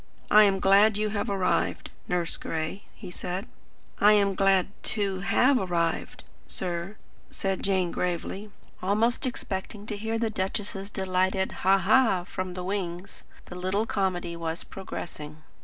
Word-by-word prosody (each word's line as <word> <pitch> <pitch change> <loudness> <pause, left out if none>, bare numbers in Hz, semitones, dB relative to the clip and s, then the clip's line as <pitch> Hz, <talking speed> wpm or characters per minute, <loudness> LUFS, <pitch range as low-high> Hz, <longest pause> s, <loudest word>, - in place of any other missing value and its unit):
"I 215 0 +9
am 195 -1 +2
glad 200 +2 +5
you 215 0 0
have 205 -1 -2
arrived, 195 -2 0 0.2
Nurse 175 -2 -1
Gray," 160 +5 -4
he 190 -5 -9
said. 180 +3 -4 0.5
"I 210 +1 +7
am 200 -2 +3
glad 195 -1 +3
TO 200 -4 -1
have 255 +7 +3
arrived, 170 -4 -1 0.2
sir," 170 - -3 0.3
said 195 -1 -2
Jane 190 -3 +1
gravely, 180 +4 -3 0.3
almost 220 +7 +2
expecting 205 -3 -5
to 215 - -1
hear 225 +2 -2
the 225 -1 0
duchess's 195 0 -3
delighted 190 -1 0
"Ha, 190 +1 +3
ha!" 200 -1 +4
from 185 0 -5
the 180 - -4
wings. 185 -1 -4 0.2
The - - -10
little 185 +4 0
comedy 185 -5 -1
was 165 0 -4
progressing. 155 -5 -8
195 Hz, 140 wpm, -27 LUFS, 180-205 Hz, 0.5 s, I